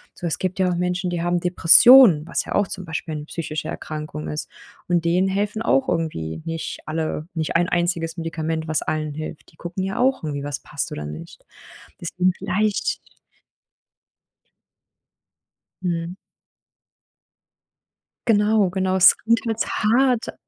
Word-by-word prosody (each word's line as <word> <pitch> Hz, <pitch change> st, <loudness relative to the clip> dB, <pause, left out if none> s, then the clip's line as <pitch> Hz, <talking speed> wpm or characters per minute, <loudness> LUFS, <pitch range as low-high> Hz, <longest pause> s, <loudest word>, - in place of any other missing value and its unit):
So, -, -, -7 dB
es 160 Hz, -, -2 dB
gibt 185 Hz, +1 st, -2 dB
ja 185 Hz, -, +3 dB
auch -, -, -1 dB
Menschen, 180 Hz, +1 st, -1 dB
die 175 Hz, -1 st, -2 dB
haben 175 Hz, 0 st, 0 dB
Depressionen, 180 Hz, -, +7 dB
was -, -, -2 dB
ja -, -, -4 dB
auch 205 Hz, -, +2 dB
zum 185 Hz, -2 st, -7 dB
Beispiel 160 Hz, -1 st, -5 dB
'ne 150 Hz, -1 st, -6 dB
psychische 155 Hz, -1 st, -5 dB
Erkrankung 155 Hz, -1 st, -6 dB
ist 150 Hz, -, -5 dB, 0.4 s
und 175 Hz, -1 st, +1 dB
denen 180 Hz, +3 st, +2 dB
helfen 205 Hz, +3 st, -1 dB
auch 265 Hz, +3 st, +2 dB
irgendwie 80 Hz, -, -3 dB
nicht 165 Hz, -1 st, -5 dB
alle 155 Hz, 0 st, -3 dB
nicht 160 Hz, 0 st, -2 dB
ein 175 Hz, +1 st, +2 dB
einziges 170 Hz, -1 st, -1 dB
Medikament, 160 Hz, -1 st, -3 dB
was 155 Hz, -, 0 dB
allen 155 Hz, -1 st, -2 dB
hilft. 155 Hz, 0 st, -8 dB
Die -, -, -25 dB
gucken 175 Hz, +2 st, -5 dB
ja 195 Hz, +4 st, -3 dB
auch 260 Hz, -5 st, +2 dB
irgendwie, 145 Hz, -2 st, -4 dB
was 145 Hz, 0 st, -4 dB
passt 140 Hz, -, -4 dB
oder 75 Hz, -, -5 dB
nicht. 75 Hz, +2 st, -10 dB, 0.6 s
Deswegen 180 Hz, +2 st, 0 dB
vielleicht 210 Hz, +1 st, -1 dB, 2.8 s
Mhm. 170 Hz, 0 st, -3 dB, 2.1 s
Genau, 210 Hz, -2 st, +3 dB
genau. 190 Hz, 0 st, 0 dB
Es 185 Hz, -, +8 dB
klingt 230 Hz, +1 st, +1 dB
jetzt 225 Hz, -1 st, -1 dB
hart 240 Hz, +2 st, +1 dB
175 Hz, 145 wpm, -22 LUFS, 155-190 Hz, 2.8 s, Es